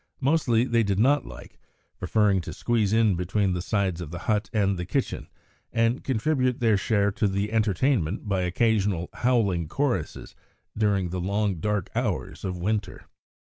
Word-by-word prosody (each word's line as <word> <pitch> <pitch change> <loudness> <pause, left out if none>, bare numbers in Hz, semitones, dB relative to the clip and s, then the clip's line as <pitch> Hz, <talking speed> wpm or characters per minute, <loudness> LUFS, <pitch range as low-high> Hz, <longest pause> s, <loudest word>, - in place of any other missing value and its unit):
Mostly 135 -5 +2
they 120 -2 +2
did 100 -3 0
not 140 +7 +3
like, - - -12 0.4
preferring 100 0 +2
to - - -7
squeeze 110 -4 0
in 110 -2 +3
between 95 +2 0
the 90 - -2
sides 95 -3 -1
of 85 - -6
the 85 - -6
hut 105 0 0
and 100 -4 +1
the 90 - -4
kitchen, 125 +9 -2 0.4
and 115 +2 +1
contribute 130 0 0
their 115 -3 +3
share 100 0 +1
to 105 +1 0
the 100 +2 -2
entertainment 110 - 0
by 95 -2 0
occasional 95 -1 +1
howling 100 -10 +1
choruses 120 - -2 0.4
during 100 -4 +1
the 90 +1 -3
long 100 +1 0
dark 105 +2 -2
hours - - -3
of 90 -2 -3
winter. 105 +4 -3
105 Hz, 160 wpm, -26 LUFS, 95-115 Hz, 0.4 s, not